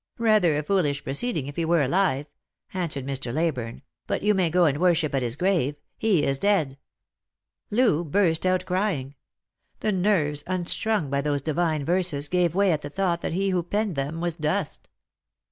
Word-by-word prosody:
Rather 215 -9 +3
a 150 - -1
foolish 150 -5 0
proceeding, 150 - -1
if 140 0 -8
he 170 - 0
were 165 -2 +2
alive," 150 -1 +1 0.5
answered 165 -8 -2
Mr. 135 -3 -2
Leyburne; 135 -6 -2
" - - -55
but - - -2
you 210 +1 +4
may 185 -4 +2
go 175 +2 +3
and 145 -2 +1
worship 165 -4 +2
at 135 - +1
his 120 -1 -1
grave. 170 -4 +1 0.2
He 200 -9 +2
is 135 -1 +1
dead." 160 -10 +1 0.9
Loo 210 -8 +2
burst 165 0 +1
out 185 0 +1
crying. 180 -8 -1 0.7
The 215 - +1
nerves, 175 -7 +1
unstrung 185 -1 -1
by 140 0 +1
those 145 -1 -1
divine 155 -1 0
verses, 170 -5 0
gave 180 -2 +1
way 200 -1 +3
at 155 -2 0
the 145 - -6
thought 175 +1 -1
that - - -3
he 195 +2 0
who 180 -1 +1
penned 205 +2 -2
them 145 +4 -3
was 170 -2 -1
dust. 155 +2 -2
170 Hz, 180 wpm, -25 LUFS, 145-190 Hz, 0.9 s, you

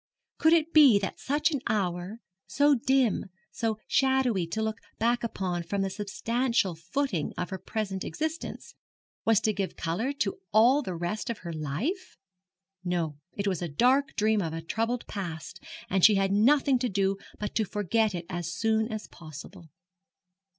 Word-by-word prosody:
Could 320 +1 +5
it 330 0 +2
be 280 -9 +8
that 195 -1 -3
such 295 +4 +1
an 285 -4 -1
hour 190 +1 -2 0.3
so 290 +1 +4
dim, 260 -2 +2 0.3
so 225 -2 -1
shadowy 265 -9 +2
to 220 +6 -2
look 220 -1 -2 0.2
back 235 +2 +1
upon 185 -6 -2
from 195 +4 -2
the 195 - -2
substantial 215 +1 0
footing 175 - -2
of 180 - -3
her 190 - -4
present 200 -3 -3
existence 315 +1 -4 0.5
was 225 -2 +5
to 220 -1 +1
give 195 -2 -3
colour 175 +11 -1
to 210 -8 -2
all 240 +7 +5
the 185 -10 -4
rest 175 +7 -3
of 220 -5 -5
her 170 - -4
life? 160 - -3 0.7
No, 170 -5 -2
it 200 - -3
was 185 -4 0
the 175 - -3
dark 255 - +2
dream 215 0 +2
of 165 -3 -3
a 165 - -4
troubled 230 +7 -2
past, 170 -6 -6 0.2
and 190 -1 0
she 215 - +8
had 195 0 +2
nothing 260 +5 +4
to 250 0 0
do 195 0 +1 0.2
but 210 - -4
to 220 - +2
forget 210 +1 0
it 170 -1 -5
as 175 -2 -4
soon 220 +4 +1
as 215 -1 -4
possible. 160 +2 -11
210 Hz, 170 wpm, -28 LUFS, 180-245 Hz, 0.7 s, be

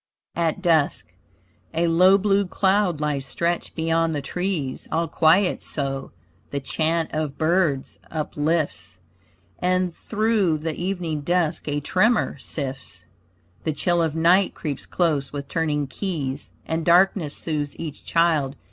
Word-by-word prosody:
AT 170 +2 -1
DUSK 145 - +2 0.6
A 170 +1 +2
low 180 +4 +6
blue 200 0 +2
cloud 190 -3 +2
lies 150 -2 -1
stretched 170 +5 -2
beyond 165 0 +1
the 145 - -2
trees, 175 -4 -3
All 165 +1 +1
quiet 165 +5 +3
so. 135 -2 -3 0.4
The 140 - -2
chant 160 +4 -1
of 155 -2 -2
birds 160 -4 +1
uplifts, 155 - -2 0.6
And 185 -1 +1
through 215 -6 +1
the 160 +1 -3
evening 175 -4 -2
dusk 170 0 0
a 145 0 0
tremor 210 - +2
sifts, 130 - -5 0.6
The 155 - -1
chill 175 +4 +1
of 160 -2 0
night 175 +4 +4
creeps 145 -5 -5
close 155 -6 0
with 140 -1 -5
turning 150 -2 0
keys, 140 -3 -4 0.2
And 160 0 -2
darkness 175 -3 +3
soothes 150 -3 -2
each 155 -3 -6
child. 160 -5 +2
160 Hz, 130 wpm, -23 LUFS, 145-180 Hz, 0.6 s, low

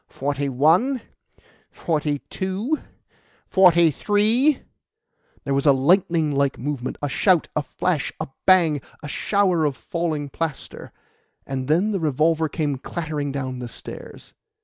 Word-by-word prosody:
"Forty 140 0 -2
one, 170 - +3 0.7
forty 150 -3 -2
two, 200 +11 -2 0.7
forty 170 -3 +5
three 220 - +2 0.4
" - - -38
There 140 - -1
was 140 +2 +1
a - - +8
lightning 160 +2 +2
like 140 -1 +1
movement 130 -1 -4
a - - +1
shout 175 +5 +2
a 150 - +2
flash 155 0 -2
a - - -3 0.2
bang 165 -6 +5 0.2
a - - -5
shower 185 +1 +1
of 145 -3 0
falling 160 -4 -3
plaster, 155 0 -5 0.5
and 130 -1 -4
then 175 +8 +2
the 195 - -1
revolver 160 +1 +1
came 145 -4 -2
clattering 150 -2 -4
down 130 -2 -4
the 125 - -5
stairs. - - -10
155 Hz, 135 wpm, -23 LUFS, 140-185 Hz, 0.7 s, a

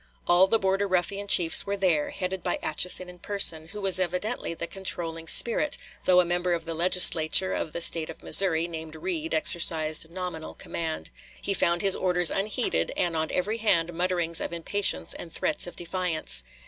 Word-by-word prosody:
All 175 +2 +3
the 225 - +1
Border 195 0 -2
Ruffian 195 +2 -3
chiefs 175 0 +5
were 200 0 -3
there, 175 -6 0
headed 190 -1 -5
by 175 - -3
Atchison 180 +3 +1
in 180 0 -14
person, 170 -5 +1
who 210 +6 -10
was 190 -2 +2
evidently 185 +2 -3
the 170 - -6
controlling 165 -3 -2
spirit, 235 - +3 0.3
though 180 -1 +4
a 180 - +2
member 175 +1 -2
of 165 -1 -4
the 165 - -5
Legislature 180 0 +4
of 155 - -4
the 170 - -4
State 165 -1 +3
of - - -12
Missouri, 170 -4 +4
named 160 -2 -9
Reid, 165 -1 -4
exercised 160 -1 +3
nominal 175 -2 -8
command. 160 -1 -6 0.3
He 200 - -3
found 175 -1 -1
his 195 -1 +5
orders 180 -2 +1
unheeded 195 - -2
and 175 -2 -1
on 160 0 -2
every 210 +5 -3
hand 175 -6 0
mutterings 175 -1 -1
of - - -5
impatience 170 - -1
and 165 - -10
threats 300 - -2
of 175 - -11
defiance. 175 - -2
175 Hz, 180 wpm, -25 LUFS, 165-190 Hz, 0.3 s, chiefs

